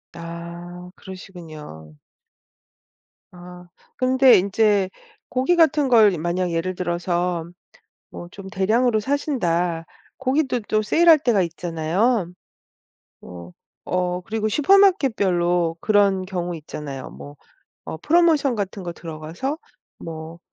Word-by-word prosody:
아 170 +1 -9
그러시군요. 155 - -11 1.4
아 180 0 -12 0.3
근데 260 0 +5
인제 200 0 +2 0.4
고기 260 +8 +1
같은 310 -4 +3
걸 220 -5 +5
이 - - -3
만약 175 +2 -1
예를 170 +3 -2
들어서 175 -1 -2 0.7
뭐 175 - -9
좀 195 0 -10
대량으로 220 +5 +1
사신다. 180 - -1 0.3
고기도 265 -1 0
또 215 0 0
세일할 325 +8 +5
때가 235 -8 +2
있잖아요. 175 +5 -1 0.9
뭐 90 0 -11 0.4
어 180 0 -1
그리고 215 +3 -2
슈퍼마켓별로 210 - +3
그런 200 -3 +2
경우 175 -2 -4
있잖아요. 150 -3 -8
뭐 145 +1 -11 0.5
어 - - -5
프로모션 310 - +3
같은 200 -2 -4
거 175 - -4
들어가서 165 - -5 0.4
뭐 160 +1 -8
185 Hz, 230 characters per minute, -22 LUFS, 170-235 Hz, 1.4 s, 근데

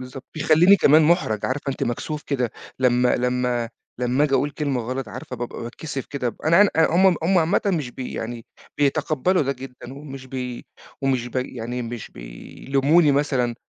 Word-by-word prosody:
بالضبط. 130 +1 -9
بيخلّيني 160 +5 +5
كمان 155 -1 +5
مُحرج، 150 - +2
عارفة 140 +2 -3
أنتِ - - -7
مكسوف 150 +5 -3
كده، 125 -5 -1 0.3
لمّا 125 -1 +3
لمّا 125 -1 0 0.3
لمّا 125 +4 +2
آجي 140 -2 +1
أقول 145 - +1
كلمة 140 -4 -2
غلط 130 0 -4
عارفة 130 +1 -7
بابقى 120 0 -6
باتكسِف 135 +3 -6
كده. 125 -4 -3
أنا 170 +5 +5
أن 205 - +4
أ 160 - +5
هم 185 -1 +5
هم 180 +2 +3
عامةً 165 +4 +2
مش 155 -10 0
بي 125 +1 -7
يعني 115 0 -6 0.3
بيتقبّلوا 150 +4 +1
ده 140 0 0
جدًّا، 130 -1 -10
ومش 135 -2 -9
بي 125 -2 -6 0.4
ومش 130 -3 0
ب 125 - -7
يعني 125 -1 -3
مش 115 -1 -7
بيلوموني 135 - +1
مثلًا، 130 -4 +1
130 Hz, 170 wpm, -23 LUFS, 125-150 Hz, 0.4 s, بيخلّيني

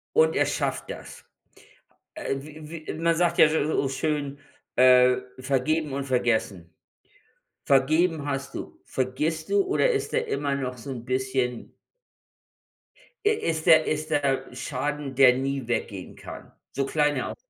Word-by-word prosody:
und 475 +1 +4
er - - +3
schafft - - -2
das. - - -9 0.9
Äh, 310 - -3
w 155 +2 -10
w - - -3
man 165 0 +2
sagt 170 +1 +1
ja - - +9
s 155 - -1
so 150 -3 +1
schön, 145 0 -2 0.4
äh: 125 0 +6 0.2
„Vergeben 140 +3 0
und 140 0 -2
vergessen.“ 110 -10 -1 0.9
Vergeben 155 +3 +2
hast 140 -1 -4
du, - - -8
vergisst 150 +5 -2
du 405 -1 +4
oder 390 +6 +2
ist 425 -3 -1
der 475 0 0
immer 145 - -1
noch 130 -2 -4
so 135 +4 -8
'n 120 -3 -6
bisschen 130 -1 -2 1.5
i - - +6
ist 160 - -2
der 160 -2 +6
ist 155 +1 -2
der 135 -3 +1
Schaden, 140 +2 -3
der 130 -1 +7
nie 135 -1 -2
weggehen 105 -5 -3
kann? - - -10 0.2
So 135 - -1
klein 150 +1 +1
er - - -2
auch - - -6
140 Hz, 150 wpm, -26 LUFS, 130-155 Hz, 1.5 s, ja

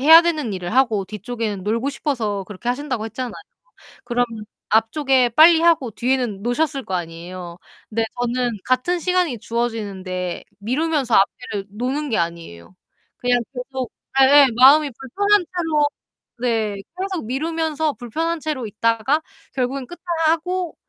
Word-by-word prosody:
해야 320 +5 +9
되는 310 -9 -1
일을 180 +1 -4
하고 235 -7 +3
뒤쪽에는 210 0 -4
놀고 230 +7 0
싶어서 225 -9 -2
그렇게 210 +4 -7
하신다고 255 -3 -3
했잖아요. 240 +2 -5 0.7
그럼 245 0 +1 0.4
앞쪽에 255 +3 +3
빨리하고 320 0 +5
뒤에는 240 -4 -1
노셨을 275 +3 -1
거 190 - -5
아니에요. 175 0 -6 0.3
근데 225 +1 0
저는 245 0 0
같은 255 +8 +1
시간이 360 - 0
주어지는데 200 -6 -3 0.2
미루면서 265 +3 0
앞에를 200 0 +1
노는 260 +7 -2
게 225 - 0
아니에요. 170 - -5 0.4
그냥 245 0 +2
계속 255 -1 -5 0.3
예예 280 +1 +8
마음이 280 +4 +7
불편한 405 +10 +2
채로 310 -4 +2 0.5
네. 225 -4 0 0.2
계속 375 - -3
미루면서 315 +3 -1
불편한 320 +8 -3
채로 295 -6 -3
있다가 230 +7 +1 0.3
결국은 260 0 -2
끝나고 345 +1 -1
250 Hz, 320 characters per minute, -21 LUFS, 220-305 Hz, 0.7 s, 해야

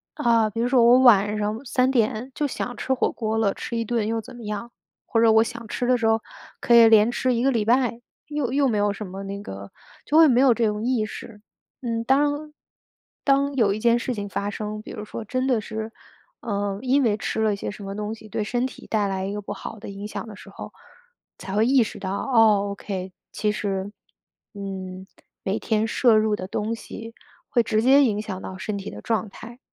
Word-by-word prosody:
啊， 230 -2 +3
比 225 +2 -3
如 245 - +1
说 255 -2 +4
我 245 +2 +7
晚 210 -5 +5
上 215 +5 -3
3 255 +1 +2
点 235 0 0
就 295 - 0
想 245 -2 -5
吃 265 - -1
火 260 - +1
锅 220 -1 -2
了， 205 -3 +2
吃 - - -6
一 230 - 0
顿 225 -2 -1
又 225 0 -1
怎 235 - -12
么 235 - -10
样， 210 +3 -5 0.3
或 225 - 0
者 230 - +6
我 220 0 +6
想 235 -1 -7
吃 245 - -3
的 255 - +4
时 225 -1 0
候 225 0 +2 0.4
可 240 - +2
以 230 -1 +9
连 220 +1 +6
吃 255 +1 0
1 235 0 0
个 270 - +3
礼 225 -4 0
拜， 245 0 +2 0.3
又 295 -5 -2
又 280 0 +3
没 225 -4 0
有 205 0 +1
什 205 0 -7
么 190 +2 -7
那 200 +1 -6
个 100 - -9 0.3
就 295 - -1
会 325 -1 +8
没 250 -3 +4
有 265 -3 +6
这 230 0 0
种 210 0 -2
意 245 -4 +1
识。 210 0 -9 0.4
嗯， 230 -2 -2
当 290 +3 +1 0.7
当 280 0 +2
有 220 -6 +3
一 210 - -4
件 235 +1 +3
事 250 +2 -2
情 205 -1 -4
发 200 +1 -2
生， 210 +1 -5
比 - - -12
如 215 -2 -7
说 225 - -6
真 255 +4 -1
的 245 -5 +2
是， 220 +1 -5 0.5
嗯， 200 -2 -2
因 265 +2 +2
为 220 -4 +2
吃 220 - -2
了 215 -2 +2
些 200 - -5
什 205 0 -10
么 195 0 -5
东 210 +1 -4
西 220 - -14
对 210 - -2
身 245 +4 -1
体 - - -13
带 210 -2 +1
来 190 -1 -2
一 200 - -3
个 210 - -3
不 200 - -6
好 - - -8
的 - - -8
影 200 +1 -7
响 210 - -6
的 215 - -9
时 - - -13
候， - - -9 0.7
才 190 +1 -6
会 215 +2 +3
意 265 0 +5
识 215 - -7
到， 190 - -4 0.2
哦 210 -3 +5
，OK， 190 -2 -5 0.2
其 210 - 0
实， 200 -1 -3 0.6
嗯， 190 -2 -7 0.4
每 195 +2 -1
天 220 0 0
摄 235 0 +4
入 215 -1 +2
的 185 -2 -6
东 215 +4 -2
西 230 0 -9 0.3
会 240 - +3
直 215 -1 +1
接 270 +4 +6
影 210 -5 +1
响 200 -4 -6
到 190 - -7
身 205 +1 -3
体 195 - -6
的 - - -9
状 225 -2 -1
态。 235 +5 -12
220 Hz, 245 characters per minute, -24 LUFS, 205-245 Hz, 0.7 s, 以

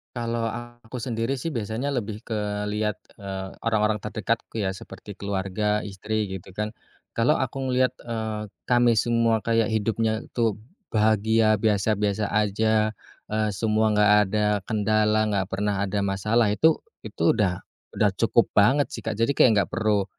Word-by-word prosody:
Kalau 115 -1 -2
aku 120 +1 -7
sendiri 115 +1 -1
sih 140 +5 -3
biasanya 115 +1 -3
lebih 110 -5 -3
ke 110 -2 -4 0.3
lihat, 105 0 -2 0.2
eee, 95 -1 -5 0.2
orang-orang 110 -1 +2
terdekatku 110 +2 -3
ya 95 - 0
seperti 95 +1 -9
keluarga, 100 +2 -1
istri 105 +1 -3
gitu 95 0 -8
kan. 105 +2 -2 0.5
Kalau 120 +6 +4
aku 130 -3 -2
ngelihat, 130 0 +1
eee, 110 -2 -4 0.2
kami 120 -1 +4
semua 115 0 +2
kayak 115 -1 +1
hidupnya 110 +1 0 0.2
tuh 110 -3 +1 0.3
bahagia, 110 0 +3
biasa-biasa 105 0 +1
aja, 110 +1 +1 0.3
eee, 110 0 -1
semua 110 +2 +1
nggak 105 0 +4 0.2
ada 105 0 +1 0.2
kendala, 110 0 +2
nggak 95 -1 -1
pernah 100 0 -1
ada 100 +1 -1
masalah, 105 +4 +1
itu 160 +8 +4 0.2
itu 85 - +1
udah 95 -5 -1 0.3
udah - - +4
cukup - - +3
banget 130 +8 +3
sih, - - -5
Kak. 110 -2 -4
Jadi 115 +5 +2
kayak 110 -8 +4
nggak - - -23
perlu, 105 -3 +1
110 Hz, 150 wpm, -25 LUFS, 105-115 Hz, 0.5 s, Kalau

